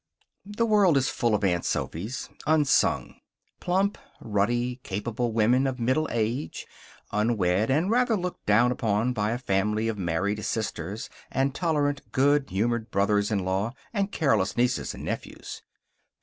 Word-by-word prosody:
The 210 +3 0
world 205 -8 +4
is 135 +1 +2
full 120 -3 +1
of 105 - -2
Aunt 90 -3 +1
Sophys, 105 +11 -3 0.2
unsung. 150 -3 +2 0.4
Plump, 195 +3 0 0.2
ruddy, 120 +4 0
capable 115 +3 -3
women 120 +5 +3
of 130 -1 -3
middle 130 +7 +1
age. 115 +5 -2 0.5
Unwed, 105 -2 +1
and 160 +9 +2
rather 245 -2 +3
looked 180 -1 -5
down 115 +4 +4
upon 115 0 0
by 105 -2 0
a 120 - -1
family 105 -1 0
of 110 -2 -2
married 95 +5 -1
sisters 105 -1 -3 0.2
and 135 +1 0
tolerant, 145 -4 0
good 140 +1 +2
humored 115 +4 -1
brothers 100 +1 +1
in 100 -4 -1
law, 95 +5 -1 0.2
and 200 -2 0
careless 110 - +1
nieces 125 +1 0
and - - -8
nephews. - - -6
120 Hz, 145 wpm, -26 LUFS, 105-140 Hz, 0.5 s, world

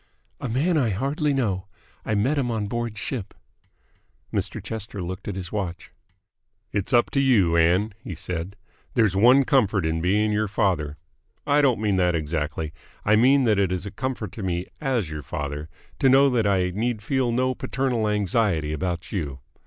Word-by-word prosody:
"A 135 - -4
man 155 +8 +2
I 120 -5 +2
hardly 140 - 0
know. 105 -9 -1 0.4
I 110 - -1
met 130 +9 +1
him 125 -3 0
on 110 -3 -1
board 120 0 -3
ship 110 -2 -4 0.5
" - - -39
Mr. - - -2
Chester 110 -2 -5
looked 95 +1 -5
at 100 - -3
his 90 -2 -6
watch. 90 -5 -4 0.8
"It's 100 -2 -2
up 120 -2 +3
to 140 - +1
you, 110 -11 +4
Ann," 90 +6 +3
he 95 -10 -6
said. 90 +2 -4 0.4
"There's 110 -6 +3
one 125 +7 +6
comfort 110 - +2
in 80 0 0
being 105 +4 +2
your 105 +1 +1
father 90 -8 0 0.5
I 145 +1 +4
don't 130 -7 +3
mean 105 -3 +1
that 90 -2 +2
exactly; 80 0 -2 0.3
I 105 - +5
mean 130 +5 +5
that 110 -4 +3
it 95 -2 +2
is 95 +1 -2
a 100 - -5
comfort 125 -6 -4
to 110 - -8
me 90 -1 -2 0.2
AS 125 - 0
your 75 -1 -5
father 75 +3 -5 0.3
to 135 - +4
know 135 +1 +6
that 115 -4 +2
I 95 -2 +2
need 110 +1 -2
feel 130 +1 +1
no 130 +2 +1
paternal 125 -4 -1
anxiety 100 -6 +1
about 85 +1 -3
you. 75 -9 -3
105 Hz, 185 wpm, -24 LUFS, 90-125 Hz, 0.8 s, one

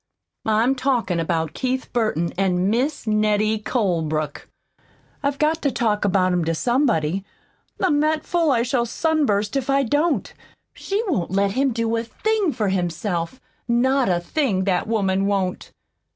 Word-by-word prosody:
"I'm 220 +4 +3
talkin' 255 -9 0
about 165 -1 -1
Keith 260 0 -3
Burton 215 -9 0
an' 185 0 +1
Mis' 265 +6 -1
Nettie 215 0 +1
Colebrook. 160 - -2 0.7
I've 280 0 -1
GOT 310 +2 +1
to 285 - +2
talk 215 -4 0
about 185 -2 +2
'em 175 -1 +1
to 165 0 0
somebody. 195 - +1 0.6
I'm 320 -6 +2
that 310 +1 +1
full 340 -3 +1
I 235 -4 +3
shall 240 -1 0
sunburst 230 -8 0
if 275 -1 -1
I 275 0 +3
don't. 290 +6 0 0.4
She 405 +3 -2
won't 255 - -1
let 195 +2 +1
him 270 +5 +1
do 230 0 -1
a 225 - -1
thing 415 - 0
for 210 -7 -1
himself 175 +3 -2 0.3
not 250 +1 +2
a 175 -1 +2
thing, 200 - 0
that 185 0 0
woman 195 -3 +1
won't!" 195 -2 -2
220 Hz, 150 wpm, -22 LUFS, 190-270 Hz, 0.7 s, I'm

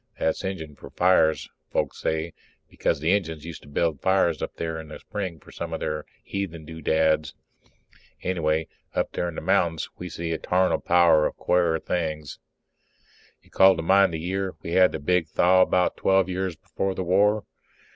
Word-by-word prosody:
That's 80 - -1
Injun 95 -6 -5
for - - -12
fires, 90 -3 +3 0.2
folks - - -2
say, 80 +1 -2 0.3
because 80 - -1
the 80 +4 +1
Injuns 80 -6 -1
used 85 - -8
to - - -16
build 75 0 -1
fires 95 -5 +2
up - - -4
there 80 -1 -4
in 80 - -9
the 75 - -9
spring 95 -6 -5
for - - -16
some 85 -1 -6
of 80 - -3
their 75 0 -3 0.2
heathen 85 -5 -5
doodads. 80 -1 0 0.9
Anyhow, 80 -3 0 0.3
up - - 0
there 85 - -2
in 85 - -9
the - - -4
mountains 80 -2 +1
we 90 - -6
see 85 +1 -4
a 80 - -2
tarnal 90 +1 +1
power 85 -3 +4
of - - -9
quare 85 -2 +2
things. 80 -3 -3 1.0
You - - -25
call 95 0 +6
to 80 - -4
mind 95 +1 +4
the 80 - -4
year 95 +3 -3
we 85 - -5
had 90 +1 +5
the - - -3
big 85 +3 +1
thaw, 90 +4 +4
about 90 -1 +2
twelve 95 -1 +3
years 95 -1 -2
before 95 +4 -3
the 95 - -2
war? 100 +4 +3
85 Hz, 185 wpm, -25 LUFS, 80-95 Hz, 1.0 s, call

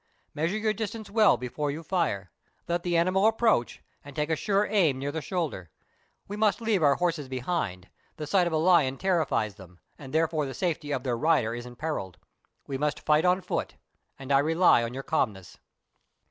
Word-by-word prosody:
Measure 165 +7 -1
your 215 0 0
distance 220 -1 -5
well 215 -1 +5
before 145 +4 -3
you 155 +4 -5
fire; 150 - -1 0.4
let 175 0 0
the 175 -1 0
animal 185 +4 +3
approach, 225 - +1 0.2
and 145 -1 -12
take 150 +2 -1
a - - +3
sure 200 +3 +1
aim 175 -12 +2
near 140 +2 -3
the 160 +1 -4
shoulder. 155 - -3 0.6
We 205 - -5
must 210 0 +2
leave 220 -5 +1
our 140 -2 +4
horses 170 -5 -1
behind; 125 - -3 0.3
the 155 - -5
sight 180 +3 +2
of 170 - -3
a - - +2
lion 155 -5 +3
terrifies 155 - 0
them, 90 -3 -15 0.2
and 135 -2 -10
therefore 160 -1 +1
tlie 135 - -7
safety 160 -5 -2
of 130 -3 -2
their 125 -3 -1
rider 150 -7 +2
is 120 +1 -6
imperilled. 120 - -5 0.5
We 135 -1 -4
must 150 +1 -1
fight 155 +2 +3
on 180 +1 +3
foot, - - -3 0.4
and 135 0 -7
I 135 - +5
rely 160 -2 +4
on 115 +1 -4
your 135 - -5
calmness." 100 - -2
155 Hz, 190 wpm, -27 LUFS, 130-180 Hz, 0.6 s, well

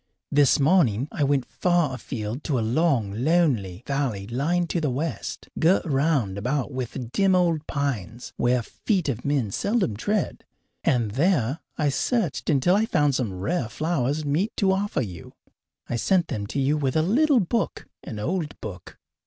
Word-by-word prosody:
This 145 -1 +4
morning 140 - +3
I 150 - -1
went 140 -2 +2
far 175 -6 +1
afield 115 +1 -5
to 140 - 0
a - - +1
long, 120 -5 +1
lonely 125 - +1
valley 135 -8 -1
lying 150 - 0
to 170 - 0
the 150 - +1
west, 145 +6 -4
girt 175 +5 +3
round 135 - +1
about 135 +6 -1
with 130 -1 -5
dim 195 +2 +3
old 170 -4 +1
pines, 125 -5 -3
where 120 0 +1
feet 185 - -1
of 125 -3 -3
men 140 -8 0
seldom 200 - 0
tread, 205 - -1 0.4
and 120 -5 +1
there 140 - +1 0.2
I 150 -2 +2
searched 195 - -1
until 155 +5 +3
I 220 +2 +2
found 145 -7 +2
some 125 -5 -1
rare 115 - -2
flowers 150 +1 -1
meet 160 +10 0
to 195 -2 +3
offer 190 -7 0
you. 90 -6 -9 0.5
I 120 - -2
sent 180 - +2
them 100 -1 -3
to 140 - -3
you 140 +3 +2
with 135 -3 -1
a 155 - +3
little 270 - +4
book, 220 +3 -1 0.2
an 110 - -7
old 160 - -3
book. 90 -5 -8
140 Hz, 170 wpm, -25 LUFS, 120-175 Hz, 0.5 s, This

